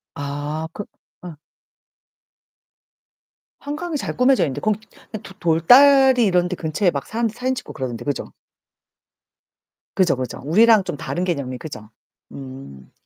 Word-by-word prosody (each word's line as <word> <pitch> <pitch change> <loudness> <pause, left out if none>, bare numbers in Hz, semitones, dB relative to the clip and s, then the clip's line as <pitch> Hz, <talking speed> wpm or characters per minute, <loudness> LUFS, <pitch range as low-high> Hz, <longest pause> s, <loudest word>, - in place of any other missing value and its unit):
아 145 +2 -4
그 205 - -6 0.4
예. 170 -4 -9 2.2
한강이 305 +3 -4
잘 - - -5
꾸며져 255 +1 +3
있는데 140 -5 -3
거기 215 -1 0 0.4
도 195 - -11
돌다리 250 - +5
이런 180 -3 +2
데 180 - -4
근처에 170 +3 0
막 140 -3 -4
사람들 230 -1 -2
사진 255 +2 -2
찍고 - - -8
그러던데, 120 -2 -5
그죠? 145 - -4 1.6
그죠, 185 -6 +3
그죠. 130 -2 -5
우리랑 215 +7 +5
좀 185 - -5
다른 175 +4 -4
개념이 140 -8 -3
그죠? 115 -6 -9 0.4
음. 130 - -11
175 Hz, 255 characters per minute, -21 LUFS, 140-230 Hz, 2.2 s, 돌다리